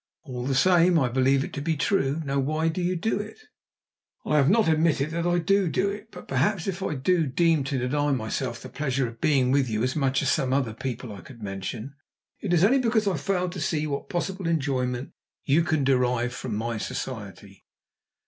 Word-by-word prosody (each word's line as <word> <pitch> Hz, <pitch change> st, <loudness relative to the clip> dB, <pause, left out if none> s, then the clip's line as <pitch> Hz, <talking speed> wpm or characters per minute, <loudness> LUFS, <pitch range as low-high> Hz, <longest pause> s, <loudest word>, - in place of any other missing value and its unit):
"All 125 Hz, -4 st, -5 dB
the 135 Hz, -, 0 dB
same 175 Hz, +3 st, +5 dB
I 130 Hz, -5 st, +2 dB
believe 135 Hz, +2 st, +2 dB
it -, -, -7 dB
to 140 Hz, -, -4 dB
be 160 Hz, +1 st, -1 dB
true. 150 Hz, 0 st, +1 dB
Now, 140 Hz, 0 st, 0 dB
why 155 Hz, +4 st, 0 dB
do 165 Hz, +3 st, -3 dB
you 180 Hz, +1 st, 0 dB
do 195 Hz, +4 st, -1 dB
it?" 215 Hz, +1 st, -7 dB, 0.9 s
"I 150 Hz, -, +2 dB
have 140 Hz, 0 st, +4 dB
not 220 Hz, +1 st, +4 dB
admitted 155 Hz, -2 st, +2 dB
that 170 Hz, +1 st, -1 dB
I 175 Hz, 0 st, +2 dB
do 190 Hz, +2 st, +2 dB
do 195 Hz, +4 st, +1 dB
it. 205 Hz, +2 st, -8 dB
But, 180 Hz, -5 st, -12 dB
perhaps, 160 Hz, +7 st, +1 dB
if 195 Hz, -1 st, -3 dB
I 175 Hz, -5 st, -2 dB
do 155 Hz, +1 st, +1 dB
seem 165 Hz, -4 st, +4 dB
to 140 Hz, -1 st, -1 dB
deny 145 Hz, +4 st, 0 dB
myself 115 Hz, -1 st, -2 dB
the 130 Hz, -, -8 dB
pleasure 135 Hz, -3 st, -1 dB
of 115 Hz, 0 st, -11 dB
being 135 Hz, -5 st, +3 dB
with 135 Hz, -2 st, +2 dB
you 110 Hz, 0 st, -1 dB
as 130 Hz, +1 st, 0 dB
much 135 Hz, -3 st, +1 dB
as -, -, +2 dB
some 130 Hz, -1 st, +1 dB
other 130 Hz, -5 st, 0 dB
people 120 Hz, -1 st, -5 dB
I 100 Hz, -, -10 dB
could 120 Hz, -5 st, -13 dB
mention, 100 Hz, +6 st, -5 dB, 0.5 s
it 200 Hz, -, -3 dB
is 175 Hz, -1 st, +4 dB
only 255 Hz, +7 st, +5 dB
because 225 Hz, -4 st, +1 dB
I 195 Hz, -, +2 dB
fail 180 Hz, +4 st, -1 dB
to 180 Hz, -, -6 dB
see 155 Hz, 0 st, 0 dB
what 140 Hz, -2 st, -4 dB
possible 185 Hz, +1 st, -2 dB
enjoyment 135 Hz, -5 st, -1 dB, 0.3 s
you 145 Hz, +5 st, +4 dB
can 155 Hz, -3 st, 0 dB
derive 125 Hz, -2 st, +1 dB
from 125 Hz, -4 st, -4 dB
my 115 Hz, +1 st, -2 dB
society." 105 Hz, -6 st, -6 dB
140 Hz, 215 wpm, -26 LUFS, 130-175 Hz, 0.9 s, same